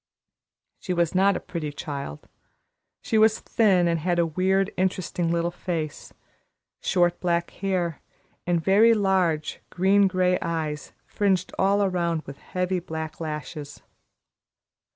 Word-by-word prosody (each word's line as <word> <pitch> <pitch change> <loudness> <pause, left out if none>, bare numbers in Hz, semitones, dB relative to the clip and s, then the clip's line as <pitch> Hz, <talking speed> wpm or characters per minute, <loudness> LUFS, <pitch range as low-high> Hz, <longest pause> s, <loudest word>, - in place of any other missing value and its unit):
She 180 - -3
was 170 0 +1
not 195 +1 +3
a - - -5
pretty 155 -4 -5
child. 140 - -6 0.8
She 220 - +1
was 215 0 +4
thin, 190 -6 +3
and 165 -1 +1
had 175 +2 0
a 170 - +3
weird, 190 +4 +1
interesting 180 -2 -1
little 170 0 0
face, 165 -4 -4 0.7
short 175 -2 +1
black 170 -1 0
hair, 180 -5 -2 0.5
and 175 -1 +2
very 205 +7 +5
large, 185 -6 0
green 195 +2 +3
gray 185 -1 +1
eyes 155 -3 -3
fringed 190 -3 0
all 200 +1 +3
around 170 -4 0
with 140 0 -10
heavy 180 0 -2
black 160 -2 -6
lashes. 150 -2 -6
175 Hz, 130 wpm, -25 LUFS, 165-190 Hz, 0.8 s, very